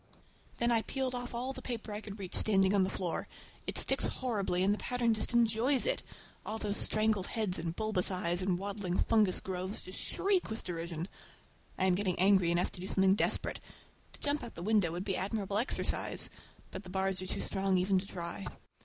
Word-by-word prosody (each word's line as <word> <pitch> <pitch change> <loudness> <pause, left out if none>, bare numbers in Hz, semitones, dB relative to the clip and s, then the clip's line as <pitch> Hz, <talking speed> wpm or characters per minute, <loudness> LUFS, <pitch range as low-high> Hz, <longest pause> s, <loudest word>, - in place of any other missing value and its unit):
Then 235 0 +2
I 230 -1 +3
peeled 265 +2 -2
off 245 -1 -4
all 255 +3 -2
the - - -8
paper 230 -4 -5
I 210 - -4
could 210 -1 -8
reach 190 -3 -7
standing 195 -2 +3
on 200 -2 +4
the 185 - 0
floor. 180 -3 -3 0.4
It - - +2
sticks - - +5
horribly 200 -8 0
and 200 +2 +4
the 210 - -3
pattern 245 -2 +1
just 220 - -1
enjoys 235 +3 +3
it! - - +1 0.4
All 215 - -3
those 205 -2 -1
strangled 215 -3 +2
heads 210 -6 0
and 165 0 -3
bulbous 215 -4 0
eyes 180 -1 0
and 185 -1 +1
waddling 195 -2 -3
fungus 210 -5 +3
growths 185 +2 -2
just 185 - -8
shriek 390 -2 0
with 220 +1 -5
derision! 170 -1 -4 0.7
I 190 - +2
am 185 - +4
getting 185 -1 0
angry 190 -1 +4
enough 175 +1 +1
to 175 - -10
do 185 - -5
something 190 -1 +4
desperate. 205 - +1 0.5
To - - -12
jump 290 0 0
out - - -4
of - - -28
the 170 - -6
window 205 -5 +3
would 175 +3 -4
be 195 -2 0
admirable 200 0 -1
exercise, 245 - +1 0.4
but - - -5
the 185 - -12
bars 190 0 -1
are 185 - -5
too - - -3
strong 195 -1 +1
even 190 +1 +3
to 195 - -7
try. 175 +1 -5
195 Hz, 210 wpm, -32 LUFS, 185-220 Hz, 0.7 s, sticks